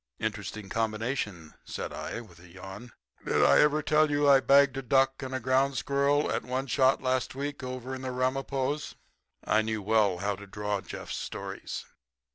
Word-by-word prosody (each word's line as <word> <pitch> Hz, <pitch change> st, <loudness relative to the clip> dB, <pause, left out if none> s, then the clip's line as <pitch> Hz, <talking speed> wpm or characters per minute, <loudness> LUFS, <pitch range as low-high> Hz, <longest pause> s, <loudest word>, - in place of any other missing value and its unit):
"Interesting 110 Hz, -2 st, -4 dB
combination," 110 Hz, -, -2 dB
said -, -, -5 dB
I, 115 Hz, -, -5 dB
with 90 Hz, -7 st, -16 dB
a 90 Hz, -, -15 dB
yawn. 95 Hz, +7 st, -10 dB, 0.3 s
"Did -, -, +3 dB
I 150 Hz, +1 st, +5 dB
tell 155 Hz, 0 st, +3 dB
you 145 Hz, 0 st, +2 dB
I 140 Hz, -1 st, +8 dB
bagged 140 Hz, 0 st, +5 dB
a -, -, -1 dB
duck 135 Hz, +1 st, +2 dB
and 130 Hz, -1 st, -4 dB
a -, -, -1 dB
ground 130 Hz, +2 st, +2 dB
squirrel 140 Hz, +2 st, +1 dB
at -, -, 0 dB
one 130 Hz, +2 st, -2 dB
shot 130 Hz, +1 st, +2 dB
last 130 Hz, 0 st, 0 dB
week 140 Hz, +1 st, -4 dB
over 130 Hz, 0 st, -5 dB
in 130 Hz, -, -5 dB
the 130 Hz, -, -4 dB
Ramapos?" 135 Hz, +3 st, -1 dB, 0.5 s
I 110 Hz, -, +3 dB
knew 110 Hz, -1 st, -3 dB
well 105 Hz, -3 st, +3 dB
how 100 Hz, +2 st, -1 dB
to 100 Hz, +1 st, -11 dB
draw 105 Hz, 0 st, -2 dB
Jeff's -, -, -6 dB
stories. -, -, -6 dB
130 Hz, 175 wpm, -29 LUFS, 110-140 Hz, 0.5 s, I